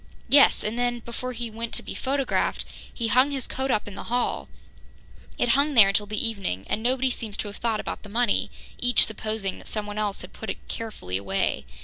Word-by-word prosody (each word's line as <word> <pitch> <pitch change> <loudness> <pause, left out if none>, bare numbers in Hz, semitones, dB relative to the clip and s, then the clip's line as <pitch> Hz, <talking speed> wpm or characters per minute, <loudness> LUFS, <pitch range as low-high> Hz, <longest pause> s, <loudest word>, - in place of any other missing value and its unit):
"Yes, 280 0 +6
and 220 +3 -2
then, 245 -1 0
before 235 +2 -5
he 235 -1 -5
went 230 +1 -4
to - - -1
be - - -6
photographed, 275 0 0 0.3
he 230 - -2
hung 255 +4 +5
his 270 -3 -1
coat 265 +1 -3
up 215 -5 +1
in 205 - -7
the - - -8
hall. 245 +1 -1 0.9
It 245 - +1
hung 280 +4 +3
there 210 -4 +9
until 205 +1 +2
the 215 +2 0
evening, 190 - -3
and 220 - -1
nobody 260 +2 +1
seems 220 -4 -5
to - - -3
have 200 - -8
thought 225 -2 0
about - - -4
the 210 - -12
money, 235 +1 +1 0.3
each 245 0 +6
supposing 215 -2 -3
that - - -11
someone 210 -1 -3
else 205 -2 -1
had - - -11
put - - -7
it - - -6
carefully 95 - -4
away. 95 -8 -1
225 Hz, 215 wpm, -26 LUFS, 205-245 Hz, 0.9 s, there